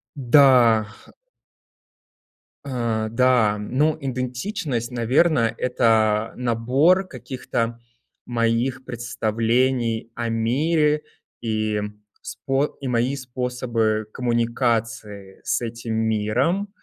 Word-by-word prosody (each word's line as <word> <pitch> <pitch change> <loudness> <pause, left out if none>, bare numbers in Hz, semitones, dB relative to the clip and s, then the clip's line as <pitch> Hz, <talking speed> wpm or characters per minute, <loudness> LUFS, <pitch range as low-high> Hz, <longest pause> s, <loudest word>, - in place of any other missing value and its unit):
Да. 125 -5 +5 1.8
Э, 115 -4 -2
да. 115 -4 +3
Ну, 150 +9 0
идентичность, 130 - -3
наверно, 125 +1 +2
это, 110 -3 +2
набор 130 +11 +2
каких-то 120 -6 -4 0.5
моих 120 +2 0
представлений 115 0 -1
о 120 -1 -2
мире 150 +7 +1 0.4
и 110 -2 -1 0.4
спо 135 +2 -1 0.2
и 135 - -4
мои 125 +3 0
способы 125 -4 -2
коммуникации 115 -4 -2
с - - 0
этим 115 -1 -5
миром. 110 - 0
120 Hz, 80 wpm, -23 LUFS, 115-130 Hz, 1.8 s, Да